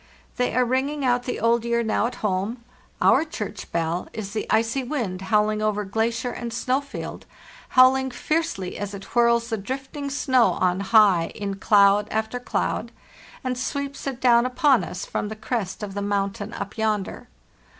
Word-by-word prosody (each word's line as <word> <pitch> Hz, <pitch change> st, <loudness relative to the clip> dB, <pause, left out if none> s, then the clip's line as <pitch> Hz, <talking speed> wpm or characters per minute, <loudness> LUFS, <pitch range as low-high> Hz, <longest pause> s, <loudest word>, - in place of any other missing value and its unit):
"They 250 Hz, -, 0 dB
are 250 Hz, 0 st, +3 dB
ringing 270 Hz, +3 st, 0 dB
out 245 Hz, 0 st, +2 dB
the 250 Hz, -, -3 dB
old 230 Hz, 0 st, +2 dB
year 235 Hz, 0 st, +1 dB
now 220 Hz, 0 st, +1 dB
at 245 Hz, -, -7 dB
home. 205 Hz, +5 st, -1 dB, 0.4 s
Our -, -, +5 dB
church 215 Hz, -10 st, -6 dB
bell 170 Hz, +1 st, -1 dB
is 200 Hz, -2 st, -6 dB
the 220 Hz, -, -3 dB
icy 230 Hz, +4 st, +2 dB
wind 235 Hz, -9 st, -3 dB
howling 210 Hz, +1 st, +1 dB
over 210 Hz, -1 st, 0 dB
glacier 230 Hz, +4 st, -1 dB
and 235 Hz, 0 st, -5 dB
snow 255 Hz, +4 st, 0 dB
field, 280 Hz, -, -8 dB, 0.5 s
howling 265 Hz, +1 st, +6 dB
fiercely 260 Hz, -, -2 dB
as 205 Hz, 0 st, -4 dB
it 195 Hz, -, -8 dB
whirls 235 Hz, 0 st, +3 dB
the 225 Hz, -, -1 dB
drifting 270 Hz, +6 st, -5 dB
snow 260 Hz, -3 st, +3 dB
on 180 Hz, 0 st, +1 dB
high 195 Hz, -4 st, +4 dB
in 200 Hz, -1 st, -4 dB
cloud 205 Hz, 0 st, +4 dB
after 220 Hz, +3 st, -2 dB
cloud, 245 Hz, -, -2 dB, 0.5 s
and 255 Hz, -1 st, -1 dB
sweeps 280 Hz, +2 st, -4 dB
it 265 Hz, -3 st, -3 dB
down 240 Hz, -1 st, +4 dB
upon 270 Hz, 0 st, +3 dB
us 180 Hz, -, -5 dB
from 205 Hz, -, -3 dB
the 220 Hz, -, -5 dB
crest 215 Hz, -2 st, -3 dB
of 200 Hz, -2 st, -5 dB
the 200 Hz, -, -3 dB
mountain 200 Hz, +1 st, -2 dB
up 200 Hz, +2 st, -6 dB
yonder. 215 Hz, -3 st, -1 dB
230 Hz, 170 wpm, -24 LUFS, 200-255 Hz, 0.5 s, howling